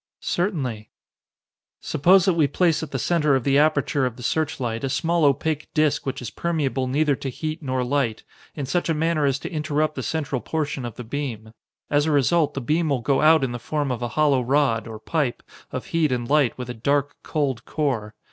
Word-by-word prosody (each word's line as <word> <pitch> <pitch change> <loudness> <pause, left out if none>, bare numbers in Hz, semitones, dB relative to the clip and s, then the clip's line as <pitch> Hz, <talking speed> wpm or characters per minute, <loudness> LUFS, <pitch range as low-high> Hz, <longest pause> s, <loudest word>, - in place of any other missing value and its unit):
"Certainly." 135 - -2 0.9
"Suppose 180 +5 +4
that 190 - +3
we 160 -3 +3
place 165 +2 +2
at 160 - -5
the 135 - -3
center 150 +2 +2
of 130 - 0
the 140 +1 +3
aperture 145 -3 +2
of 120 - -6
the 125 - -10
searchlight 130 -5 -1
a 135 - 0
small 165 +4 +1
opaque 150 +2 0
disc 155 -3 +1
which 135 -1 -3
is 115 - -5
permeable 145 -6 -1
neither 145 +2 +2
to 135 - -4
heat 155 +5 -4
nor 130 -3 -1
light, 125 -4 -1 0.3
in 145 - -3
such 175 +6 -1
a 165 - +2
manner 155 -1 +1
as 135 -1 +1
to 135 - -7
interrupt 155 -1 0
the - - -4
central 145 -5 -2
portion 150 -5 -3
of 120 - -6
the 125 - -7
beam. 115 -4 -5 0.4
As 145 +1 +3
a - - +2
result, 150 +3 +2
the 140 - -2
beam 155 +5 +1
will 135 -4 0
go 135 +3 +1
out 160 -1 +6
in 130 - -1
the 120 - -5
form 145 +2 -2
of 125 -1 -3
a 120 - -1
hollow 145 -4 +4
rod, 125 -3 +1
or 110 -1 -7
pipe, 130 +3 -2 0.3
of - - -4
heat 160 -4 +2
and 120 -1 -1
light 145 -3 +2
with 125 -1 -5
a - - -5
dark, 140 +5 0
cold 135 -6 -2
core. 125 -9 -2
140 Hz, 215 wpm, -23 LUFS, 125-155 Hz, 0.9 s, out